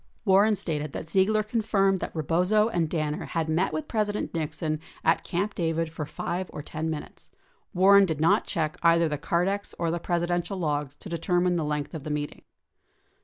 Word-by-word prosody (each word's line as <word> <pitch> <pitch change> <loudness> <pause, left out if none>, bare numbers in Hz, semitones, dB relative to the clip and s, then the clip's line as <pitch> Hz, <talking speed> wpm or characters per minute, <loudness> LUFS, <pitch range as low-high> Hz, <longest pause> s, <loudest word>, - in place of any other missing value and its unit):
44 200 - +1
Warren 210 +3 +5
stated 155 -6 -3
that 160 - -6
Ziegler 210 +3 +3
confirmed 205 -3 +1
that - - -5
Rebozo 180 +8 +2
and 170 -7 0
Danner 155 -2 -2
had 165 -2 -2
met 165 +4 +1
with 310 -1 -3
President 210 -2 -1
Nixon 155 -1 -2 0.2
at 165 - +3
Camp 195 +4 -2
David 165 -2 -1
for 155 -2 -5
5 180 +4 -4
or 150 - -7
10 160 +2 -4
minutes. 155 -2 -7 0.5
War 190 +3 +6
ren 200 -1 +6
did 160 -3 -2
not 160 +2 +3
check 155 -2 -1
either 170 0 +4
the 150 -2 -3
Cardex 185 +6 -1
or 170 -1 0
the 170 - -1
Presidential 175 +2 -1
logs 145 -5 -2
to - - -11
deter 175 +1 0
mine 180 0 +2
the 165 - 0
length 150 0 -2
of 160 - -5
the 155 - -5
meeting. 150 0 -3
170 Hz, 195 wpm, -27 LUFS, 155-195 Hz, 0.5 s, War